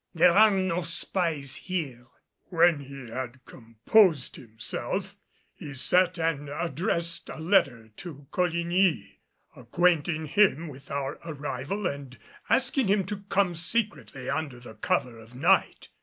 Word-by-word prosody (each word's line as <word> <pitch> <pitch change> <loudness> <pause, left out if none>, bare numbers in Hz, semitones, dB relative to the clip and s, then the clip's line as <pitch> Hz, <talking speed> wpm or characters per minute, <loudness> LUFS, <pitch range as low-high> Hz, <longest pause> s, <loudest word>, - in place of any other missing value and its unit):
There 175 +2 +6
are 215 +4 +7
no 185 -3 0
spies 165 -4 -1
here." 140 -10 -4 0.4
When 170 -3 +4
he 135 -3 -10
had 130 +1 -6
composed 130 - +2
himself, 110 -2 -4 0.4
he 145 -2 -9
sat 180 +6 +3
and 160 -3 -1
addressed 170 +2 -2
a - - -7
letter 140 - +2
to 145 -5 -9
Coligny, 170 - 0 0.4
acquainting 160 +4 +1
him 170 -1 +2
with 135 0 -13
our 140 -1 -3
arrival 150 +4 -4
and 140 -6 -4 0.3
asking 265 -2 +2
him 195 -1 +2
to 205 +2 -4
come 195 -3 +2
secretly 165 - -2
under 140 -3 -3
the 120 -2 -11
cover 115 +2 -1
of 115 +2 -15
night. 170 +9 +2
160 Hz, 125 wpm, -27 LUFS, 135-180 Hz, 0.4 s, are